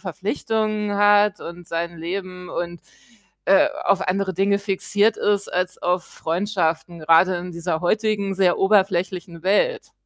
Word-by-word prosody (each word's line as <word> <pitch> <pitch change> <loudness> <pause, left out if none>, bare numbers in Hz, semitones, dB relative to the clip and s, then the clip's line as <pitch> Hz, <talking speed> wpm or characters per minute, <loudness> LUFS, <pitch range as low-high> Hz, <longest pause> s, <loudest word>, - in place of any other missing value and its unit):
Verpflichtungen 210 - -2
hat 205 0 +4
und 175 0 -9
sein 170 0 -4
Leben 180 +1 -6
und, 175 -1 -5 0.6
äh, 195 +10 +5 0.2
auf 200 -1 +2
andere 190 0 -1
Dinge 200 +2 +2
fixiert 205 +2 +1
ist 205 -1 0
als 180 0 -2
auf 180 0 0
Freundschaften, 170 -2 -2
gerade 165 +4 +4
in 180 +1 -7
dieser 170 -1 -3
heutigen, 205 +1 0
sehr 185 -2 +3
oberflächlichen 190 -3 +1
Welt. 210 - +1
190 Hz, 130 wpm, -22 LUFS, 175-205 Hz, 0.6 s, äh